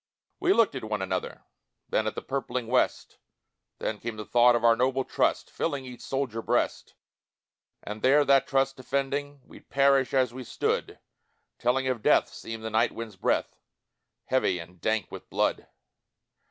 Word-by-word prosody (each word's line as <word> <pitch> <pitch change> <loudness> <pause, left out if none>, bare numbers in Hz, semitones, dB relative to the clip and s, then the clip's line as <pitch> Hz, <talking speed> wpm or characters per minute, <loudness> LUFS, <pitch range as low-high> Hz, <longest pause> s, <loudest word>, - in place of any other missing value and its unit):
We 370 0 +2
looked 230 - +4
at 130 - -5
one 105 -2 -2
another, 95 -1 -4 0.4
Then 110 - 0
at 110 - -3
the - - -5
purpling 130 -2 -3
west, 125 +2 0 0.6
Then 105 - -3
came 115 0 -5
the 105 - -6
thought 120 +2 +5
of 120 - -1
our 115 -1 +6
noble 130 +2 +1
trust, - - 0
Filling 140 -5 -2
each 125 -1 -10
soldier 130 -4 -2
breast; - - -1 0.9
And 105 +1 -6
there, 145 +3 +5
that 135 -1 +4
trust 135 0 +1
defending, 140 +2 -2
We'd - - -16
perish 135 -1 +3
as 130 -3 +2
we 130 0 -7
stood - - -2 0.6
Telling 130 +2 +1
of 125 -4 -1
death - - +4
seemed 115 0 -7
the 110 - -4
night 110 +2 +2
wind's 115 -3 -7
breath, - - -1 0.6
Heavy 130 -8 +1
and 85 +1 -11
dank 110 -3 0
with - - -10
blood. - - 0
125 Hz, 165 wpm, -27 LUFS, 110-135 Hz, 0.9 s, our